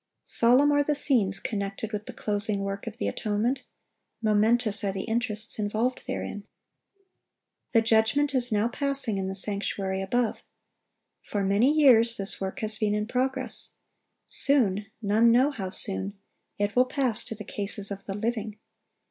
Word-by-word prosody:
Solemn 255 +5 +6
are 290 0 +3
the 295 +1 0
scenes 225 -9 +4
connected 200 0 -5
with 210 -1 -6
the - - -7
closing 205 -1 -1
work 195 +2 -5
of 225 0 -7
the - - -2
atonement. 225 +5 -2 0.5
Momentous 215 0 +2
are 200 - 0
the 190 0 -4
interests 225 -2 0
involved 220 +5 -2
therein. 205 -1 -6 1.3
The 225 -2 +4
judgment 225 +6 +2
is 250 -2 0
now 210 +1 +1
passing 265 -5 -2
in 190 - -3
the 190 - -5
sanctuary 195 -1 -3
above. 230 +4 -1 0.8
For 205 -1 -4
many 200 +8 +2
years 240 -7 +4
this 195 0 -4
work 190 +6 -5
has 215 0 +3
been 210 -1 0
in 210 0 -2
progress. 260 +2 -2 0.5
Soon—none 220 -3 +2
know 255 +5 +3
how 195 -9 -6
soon—it 200 +1 -3
will 250 +1 +4
pass 255 -4 -1
to 225 - -6
the 210 - -9
cases 200 0 -3
of 195 0 -7
the 195 - -5
living. 220 -1 -4
215 Hz, 150 wpm, -26 LUFS, 200-245 Hz, 1.3 s, Solemn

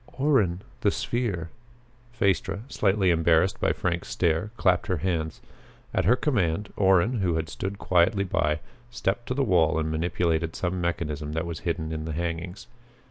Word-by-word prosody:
"Orrin 110 - +2 0.2
the 105 - +3
sphere!" 110 -7 -2 0.6
Phaestra, 100 -3 0
slightly 95 -5 +2
embarrassed 80 +2 +3
by - - +3
Frank's 85 -1 -2
stare, 85 +4 0
clapped 90 -2 +2
her 90 - 0
hands. 80 -2 -2 0.5
At - - +1
her 115 +7 +5
command, 105 - 0
Orrin, 95 +5 +3
who 90 -4 +1
had 80 0 -2
stood 95 +1 -4
quietly 95 +2 +2
by, 75 -5 0 0.3
stepped 120 0 -2
to 125 - -2
the 140 - +2
wall 85 - +3
and 80 0 -1
manipulated 85 0 0
some 90 0 -2
mechanism 75 -3 -2
that 80 +2 -1
was 85 -1 -5
hidden 80 -2 -2
by 80 - -3
the 80 0 -4
hangings. 85 +4 -4
90 Hz, 160 wpm, -26 LUFS, 80-100 Hz, 0.6 s, her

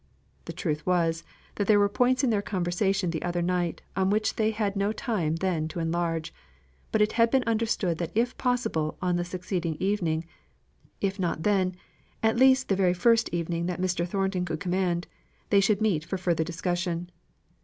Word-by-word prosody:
The - - -6
truth 155 -3 -2
was, 165 -2 +1 0.3
that 205 - 0
there 215 - +6
were 205 0 +4
points 250 +6 +2
in 255 - +3
their 205 -2 +1
conversation 185 -1 0
the 160 - -3
other 175 0 -1
night 175 -1 -1
on 190 0 +2
which 215 +1 +1
they 220 -1 +2
had 210 -2 -1
no 200 +1 +1
time 210 - -1
then 165 -3 -1
to 160 - -6
enlarge; 165 -1 -1 0.6
but 215 - +4
it 210 - 0
had 230 0 +3
been 265 +1 +2
understood 220 -7 0
that 170 - -2
if 240 +3 +1
possible 240 -12 -1
on 180 -1 0
the 175 - 0
succeeding 175 -2 -3
evening 175 -5 0 0.8
if 195 0 -1
not 170 -3 -1
then, 190 -3 +2 0.5
at 220 0 +3
least 260 +1 +5
the 195 - +2
very 185 -2 +2
first 230 +5 +3
evening 170 0 -2
that 180 0 -3
Mr. 180 -1 0
Thornton 190 0 -1
could 175 - -3
command, 180 -2 0 0.5
they 200 - +6
should 200 +1 +2
meet 190 -9 +1
for 190 - -3
further 170 -3 0
discussion. 175 +1 -2
185 Hz, 185 wpm, -27 LUFS, 170-210 Hz, 0.8 s, there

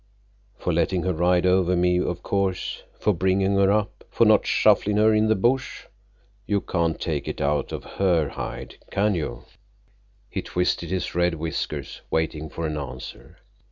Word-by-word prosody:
"For 90 - -2
letting 85 +2 +1
her 95 - 0
ride 90 +2 +2
over 90 0 +3
me, 90 0 +2
of 90 -1 -2
course. 95 -2 -1 0.2
For 105 - +2
bringing 95 +2 +1
her 100 0 +4
up. 105 0 -1
For - - +3
not - - +4
shufflin' 105 0 +3
her 110 +1 +5
in 110 0 +3
the 110 - +3
bush. 120 +7 0 0.6
You 100 -1 +2
can't 85 -4 -1
take 75 -4 -2
it - - -4
out 70 0 0
of - - -5
her 85 -7 +1
hide, - - -7
can 105 +1 +1
you?" 75 -8 -4 0.8
He - - -4
twisted 90 -2 -1
his 95 -1 -2
red 85 0 +1
whiskers, 80 0 -4
waiting 80 -1 -1
for 85 +3 -5
an 75 -1 -2
answer. 65 -3 -8
90 Hz, 165 wpm, -24 LUFS, 80-100 Hz, 0.8 s, her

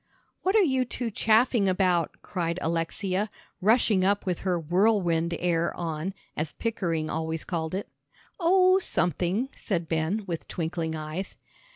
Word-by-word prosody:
"What 380 +3 +1
are 430 - +6
you 265 -6 +2
two 240 -1 -4
chaffing 220 -1 +3
about?" 180 -3 +1
cried 170 -2 -2
Alexia, 185 +5 -1 0.3
rushing 215 -2 +4
up 200 +2 +2
with 180 -3 -1
her 180 -2 0
"whirlwind 175 -1 +2
air" 170 -1 +1
on, 165 +3 -3 0.2
as 155 0 -3
Pickering 170 -9 -1
always 160 0 -2
called 165 -1 -3
it. 195 - -3 0.5
"Oh, 370 +2 +5
something," 185 - 0
said 175 -6 -2
Ben, 165 +7 0
with 170 -4 -5
twinkling 165 -1 -3
eyes. 155 +5 -5
180 Hz, 140 wpm, -27 LUFS, 165-215 Hz, 0.5 s, are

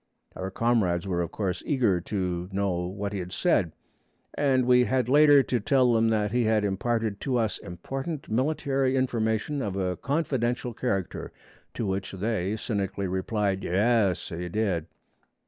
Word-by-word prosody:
Our 95 - -4
comrades 100 -5 +1
were 90 -2 0
of 85 - -3
course 95 -4 -2
eager 115 - +1
to 90 -2 -3
know 95 -3 -1
what 100 +2 -4
he 100 - -2
had 90 0 -6
said, 95 - +1 0.6
and 135 -3 +2
we 125 0 +5
had 130 -2 +1
later 145 +1 +6
to 125 - 0
tell 130 +1 +3
them 115 0 +3
that 105 -2 +1
he 120 0 +1
had 110 -1 +2
imparted 110 +1 -1
to 130 -2 0
us 110 -4 0
important 135 - -6
military 135 +1 0
information 120 +2 0
of 100 -5 -3
a 90 -2 -1
confidential 125 -5 -1
character; 100 -7 -3 0.4
to 115 - -2
which 95 0 -3
they 100 0 -1
cynically 100 -3 -2
replied, 95 +1 -1
'Yaas, 100 +1 +2
he 90 +1 -4
did!' 95 -5 -1
110 Hz, 155 wpm, -27 LUFS, 95-125 Hz, 0.6 s, later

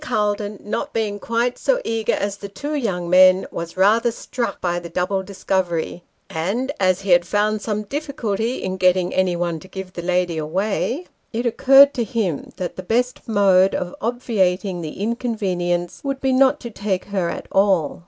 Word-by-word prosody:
Calton, 210 -5 -1
not 290 +7 -3
being 210 -2 -1
quite 235 +3 -1
so - - +2
eager 225 -1 0
as 200 0 -2
the 200 0 -8
two 285 +10 -5
young 195 -11 -1
men, 185 +1 +6
was 170 +1 -6
rather 220 +5 +4
struck 235 -2 -4
by 175 -1 -1
the 170 -1 -9
double 180 +3 -1
discovery; 185 -3 -2 0.3
and 195 - -2
as 185 -1 +2
he 195 -1 -2
had 175 0 +6
found 210 +3 0
some 210 -1 -2
difficulty 240 -3 -3
in 185 0 -3
getting 185 -1 +2
anyone 175 -3 0
to 190 - -14
give 190 -1 -8
the 175 - -5
lady 180 -2 0
away, 200 - -1 0.3
it 235 +2 -2
occurred 270 +4 +6
to 240 - -1
him 195 -8 -2
that 180 -2 -4
the - - -4
best 245 +7 -1
mode 195 -3 +4
of 180 0 -3
obviating 200 -6 0
the 155 +1 -7
inconvenience 195 -6 -2
would 275 -1 -2
be 265 -1 +1
not 270 +2 +4
to 235 - -7
take 200 -3 -2
her 190 -4 -1
at - - -5
all. 190 -6 +2
200 Hz, 175 wpm, -21 LUFS, 180-230 Hz, 0.3 s, men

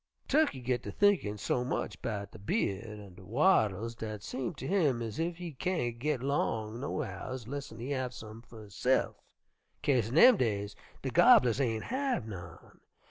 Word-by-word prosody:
"Tukkey 295 - +2
git 125 -1 0
ter - - -7
thinkin' 165 - +2
so 125 +4 0
much 110 -6 -3
'bout 100 -3 -4
de - - -12
by'ud 100 - -1 0.2
an' 100 -3 -12
de 95 +2 -14
wattles 115 - +2
dat 110 -3 -6
seem 135 - -4
ter 130 - -7
him 150 -7 +2
ez 115 +1 -5
ef 170 +1 -1
he 175 -2 -6
kain't 125 -7 -2
git 140 -1 -1
long 115 -5 -1
no 140 - -2
hows 130 -3 -6
lessen 140 -3 -6
he 125 +5 -5
have 130 -2 -1
some 110 -2 -10
fer 115 -2 -13
hisse'f, 105 +6 +1 0.7
'kase 125 -6 +2
in 125 - -4
dem 245 +7 +8
days 100 - -1 0.3
de - - -2
gobblers 125 +1 +6
ain' 115 -4 0
have 260 - -1
none. 85 -5 -10
120 Hz, 180 wpm, -31 LUFS, 110-145 Hz, 0.7 s, dem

